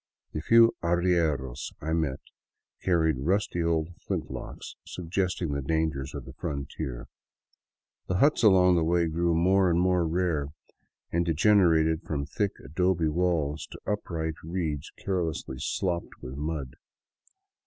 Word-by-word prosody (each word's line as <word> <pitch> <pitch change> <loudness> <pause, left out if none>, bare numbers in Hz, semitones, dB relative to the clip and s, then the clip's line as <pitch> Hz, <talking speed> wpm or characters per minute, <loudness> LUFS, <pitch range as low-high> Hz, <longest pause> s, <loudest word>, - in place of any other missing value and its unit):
The 75 - -3
few 115 +5 +6
arrieros 85 -7 0
I 80 +2 -2
met 75 -5 -1 0.6
carried 80 -6 +2
rusty 90 +4 0
old 85 -1 +1 0.2
flint - - -2
locks, - - -7
suggesting 90 -1 -2
the 70 0 -1
dangers 70 -2 -1
of - - -6
the - - -10
frontier; 70 -3 -5 1.0
the 90 - 0
huts 145 +8 +4
along 90 -5 +6
the 85 - +2
way 85 +1 +2
grew 85 +1 +1
more 95 +3 +4
and 85 0 +2
more 90 -2 +2
rare, 80 -4 0 0.6
and 85 +1 +2
degenerated 80 -2 +4
from 70 -2 -3
thick 100 +7 -1
adobe 85 +2 +1
walls 80 -3 0
to - - -10
upright 80 -6 -3
reeds 80 -4 -3
carelessly 80 -8 -3
stopped 90 -3 -2
with 65 - -8
mud. 75 -3 -4
85 Hz, 130 wpm, -28 LUFS, 75-90 Hz, 1.0 s, few